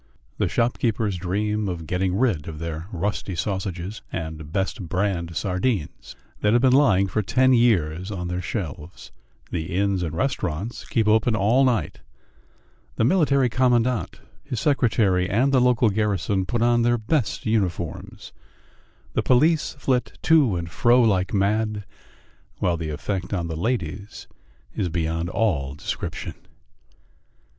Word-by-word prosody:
The - - +1
shopkeepers 115 -3 0
dream 105 +3 -1
of 85 -3 -5
getting 90 +2 -1
rid 105 - +1
of 80 -2 -6
the 80 0 -5
rusty 95 +1 -3
sausages 95 +1 -3
and 80 -2 -6
"best 95 -1 -2
brand" 90 -3 -1
sardines 90 - -2 0.2
that 105 +1 +2
have 120 - +4
been 130 -1 +5
lying 115 -9 +4
for 110 +3 -1
ten 130 +5 +3
years 95 -7 +2
on 90 -4 -4
their 90 +1 -3
shelves; 85 -3 -6 0.4
the 85 +1 -3
inns 100 -1 +1
and 85 -2 -3
restaurants 100 - -2
keep 110 -3 0
open 110 +1 +3
all 110 +6 +3
night; 125 -4 0 1.0
the - - +1
Military 140 -2 +3
Commandant, 125 -1 +1 0.2
his 125 - -4
secretary, 110 -10 +2
and 130 +7 +2
the 130 - +5
local 125 -3 +3
garrison 100 -2 0
put 120 +2 0
on 120 0 +3
their 120 +1 +3
best 120 +3 -1
uniforms; 95 -7 -2 0.8
the - - +1
police 150 +5 +2
flit 130 -2 -1
to 150 - +4
and 85 -1 -4
fro 120 +6 +4
like 100 -6 +2
mad, 105 +1 0 0.7
while 90 -2 +1
the 80 -1 -4
effect 90 +5 -3
on 85 -3 -2
the 80 - -3
ladies 100 +1 -3 0.5
is 95 -4 -1
beyond 85 0 -2
all 75 -12 0
description. - - -5
100 Hz, 140 wpm, -24 LUFS, 90-120 Hz, 1.0 s, been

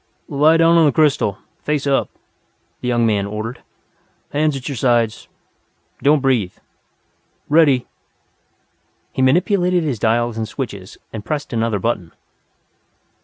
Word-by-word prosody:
"Lie 150 +3 +4
down 165 +1 +5
on 160 - +5
the - - +3
crystal, 140 - +2 0.2
face 150 -2 -1
up," 140 -1 +1 0.7
the - - -4
young 120 -1 +2
man 105 -3 +1
ordered. 110 +4 -6 0.7
"Hands 150 0 +1
at 130 - -8
your 140 - -3
sides, 120 -2 0 0.7
don't 145 0 +3
breathe. 120 -9 +1 1.0
Ready!" 145 -5 +4 1.3
He - - -3
manipulated 180 +5 +2
his 135 -8 -2
dials 115 +1 +1
and 110 - -2
switches, 100 -7 -6 0.2
and 110 -2 -6
pressed 145 +1 -4
another 115 -2 0
button. 95 -5 -3
130 Hz, 125 wpm, -19 LUFS, 110-150 Hz, 1.3 s, down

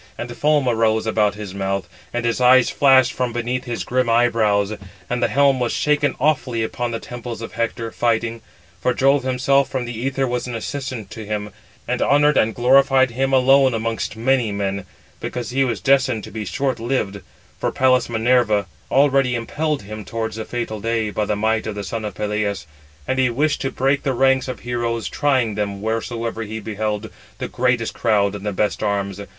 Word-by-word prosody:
And 120 0 -6
foam 150 0 +2
arose 110 -2 +2
about 105 -2 +1
his 105 -3 -7
mouth, 95 -2 -2 0.2
and 120 0 -2
his 115 +2 0
eyes 125 0 +6
flashed 135 -2 +5
from 125 -1 -1
beneath 120 +2 -2
his 120 -2 -3
grim 125 -1 0
eyebrows; 110 -3 +2 0.3
and 125 0 -2
the - - +3
helm 140 -1 +3
was 120 -1 0
shaken 145 -2 +1
awfully 130 -5 +1
upon 120 +2 -3
the 115 -1 -3
temples 120 -1 -7
of 115 - -7
Hector, 115 0 -2
fighting; 115 -1 0 0.4
for 125 - +1
Jove 135 +1 +3
himself 130 +2 +2
from 130 -2 -2
the 120 +2 -3
æther 135 0 -1
was 125 0 -2
an 120 - -4
assistant 130 -2 -5
to 110 - -7
him, 105 0 -4 0.4
and 125 0 -1
honoured 145 +1 +4
and 110 0 +2
glorified 130 +1 +4
him 135 +3 -1
alone 135 -1 +5
amongst 115 0 -2
many 120 -1 +1
men; 100 -1 -2 0.3
because 120 -2 -4
he 135 +2 +2
was 125 -3 -1
destined 130 -5 +2
to - - -9
be 110 0 -5
short 135 -1 -1
lived: 115 -4 -2 0.4
for - - -1
Pallas 130 -2 +2
Minerva 115 -3 +2 0.2
already 135 -2 +3
impelled 145 +3 -2
him 105 +1 -7
towards 110 +2 -4
the 110 - -4
fatal 115 -3 -4
day, 115 -1 -1
by 105 0 -1
the 105 - -1
might 110 +2 0
of 110 - -4
the 100 - -4
son 110 +2 -4
of 105 - -5
Peleus. 105 -1 -2 0.4
And 130 - 0
he 130 -1 +3
wished 145 +5 0
to 135 - -1
break 135 +2 +1
the 135 - -1
ranks 135 +1 +3
of 130 - -6
heroes, 120 -1 -2
trying 130 -7 +1
them, 100 -1 -3
wheresoever 115 +1 -3
he 110 0 -5
beheld 110 0 -3 0.3
the - - -4
greatest 125 -2 0
crowd 105 -3 +1
and 100 -1 -7
the 105 - -1
best 105 +2 -1
arms. 100 -1 -1
120 Hz, 190 wpm, -21 LUFS, 110-130 Hz, 0.4 s, eyes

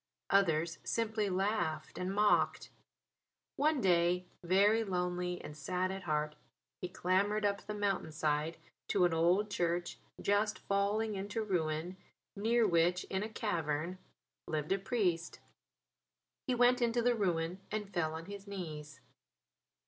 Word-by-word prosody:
Others 170 -4 +2
simply 220 -2 0
laughed 185 -5 -1
and 180 +1 -2
mocked. 210 +1 +2 0.8
One 305 0 +2
day, 180 -1 +3 0.2
very 200 +5 +4
lonely 180 -2 -2
and 150 - -8
sad 180 +5 -1
at 190 0 -5
heart, 150 -1 0 0.5
he 180 - -3
clambered 200 +4 +1
up 200 0 +1
the 210 - -3
mountain 200 -5 -1
side 155 +1 0 0.3
to 180 - +3
an 175 - +2
old 180 +6 +3
church 175 -1 -1 0.2
just 205 +1 +1
falling 205 +2 0
into 205 +3 -3
ruin 175 -2 -1 0.4
near 225 +3 +3
which, 175 0 +3
in 190 - 0
a 215 - -3
cavern, 170 -5 -2 0.5
lived 155 0 -2
a 195 - +2
priest. 185 -5 -1 1.1
He 255 - +2
went 245 +1 +4
into 235 0 +2
the 245 0 +4
ruin 180 -4 0
and 210 -2 -4
fell 160 -3 0
on 165 +1 -6
his 200 +1 -9
knees. 155 -6 -7
185 Hz, 135 wpm, -34 LUFS, 170-210 Hz, 1.1 s, very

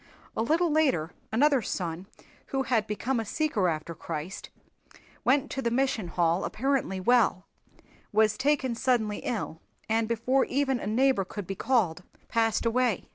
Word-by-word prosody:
A - - 0
little 320 +8 +2
later 265 - +2 0.2
another 275 +3 +4
son 180 -2 -4 0.4
who 270 -1 -1
had 230 -5 +1
become 235 +4 -1
a - - -1
seeker 225 - 0
after 160 +1 -3
Christ 165 +3 -6 0.7
went 275 +2 +2
to 270 - -2
the 235 - 0
Mission 255 -4 0
Hall 170 +1 +1
apparently 260 -6 -1
well 200 -3 +3 0.7
was 215 0 +3
taken 265 -2 +1
suddenly 230 -3 +1
ill 190 -8 -4 0.3
and 225 0 +1
before 240 +4 +1
even 270 -2 0
a - - -5
neighbor 250 0 +3
could 200 +1 -7
be 195 - -4
called 195 -6 +1 0.3
passed 225 -1 +1
away. 235 -3 +1
230 Hz, 150 wpm, -28 LUFS, 195-265 Hz, 0.7 s, another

